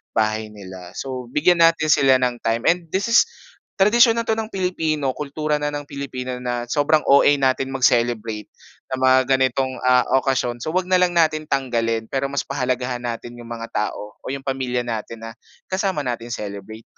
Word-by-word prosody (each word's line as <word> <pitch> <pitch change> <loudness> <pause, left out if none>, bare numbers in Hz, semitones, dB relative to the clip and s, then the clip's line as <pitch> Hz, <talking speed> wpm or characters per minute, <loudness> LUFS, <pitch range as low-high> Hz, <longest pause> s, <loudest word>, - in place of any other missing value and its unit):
bahay 110 0 0
nila. 95 -4 -11
So 130 -2 -5
bigyan 165 +7 +2
natin 165 -2 +4
sila 135 -3 +5
ng 120 -1 -1
time 115 +1 -1
and 175 -1 -4
this 195 +7 -2
is 240 - +6 0.5
tradisyon 230 +4 +5
na 230 - -1
ito 225 -1 -1
ng 220 0 -4
Pilipino 160 -7 -1
kultura 150 +1 -2
na 150 0 -3
ng 145 -1 -6
Pilipino 130 -3 -5
na 120 -1 -4
sobrang 150 +2 +2
OA 140 0 +5
natin 135 0 +1
mag-celebrate 115 -4 +1 0.4
sa 130 - -4
mga 130 0 +5 0.2
ganitong 130 0 0
ah, 125 -1 +4 0.2
okasyon. 125 -3 -1
So 155 - -3
huwag 185 +2 0
na 185 0 +2
lang 175 -1 +2
natin 155 -2 +2
tanggalin 115 -4 0
pero 135 +3 -2
mas 140 0 -2
pahalagahan 125 -2 -2
natin 120 0 -5
yung 115 - -12
mga 115 -1 -5
tao 105 0 -3
o - - -22
yung 135 +1 -5
pamilya 125 -2 -2
natin 115 0 -5
na 115 - -7 0.4
kasama 190 -7 -1
natin 120 -1 -4
i-celebrate. 105 0 -7
130 Hz, 180 wpm, -21 LUFS, 120-155 Hz, 0.5 s, is